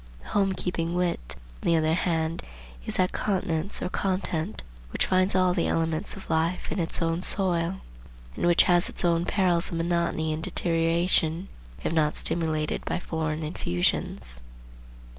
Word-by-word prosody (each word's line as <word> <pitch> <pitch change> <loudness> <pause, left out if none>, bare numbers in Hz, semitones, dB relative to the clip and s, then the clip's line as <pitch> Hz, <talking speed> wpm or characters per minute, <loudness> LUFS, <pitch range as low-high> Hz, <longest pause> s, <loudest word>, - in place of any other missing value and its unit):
The - - -11
home 195 -1 +2
keeping 175 -2 -2
wit, 175 - -1 0.3
on - - -3
the 170 - +5
other 160 0 +2
hand, 165 -1 0 0.5
is - - -2
that 185 0 +2
continence 185 -2 0
or - - -1
content 185 -1 -2 0.3
which - - 0
finds 185 +1 +2
all 185 -1 +4
the 175 -2 +1
elements 165 +4 0
of 195 - -10
life 165 +3 0
in 200 - -2
its 170 0 0
own 165 +1 0
soil; 185 -1 +1 0.5
and - - 0
which 175 0 +6
has 175 0 +3
its - - -2
own 170 0 +2
perils 180 -4 +1
of 170 - -3
monotony 165 -2 0
and 155 - -4
deterioration, 165 +1 +2 0.3
if - - -1
not 150 -2 +2
stimulated 160 -2 -1
by - - -1
foreign 160 -2 -3
infusions. 85 - -2
170 Hz, 160 wpm, -27 LUFS, 160-180 Hz, 0.5 s, which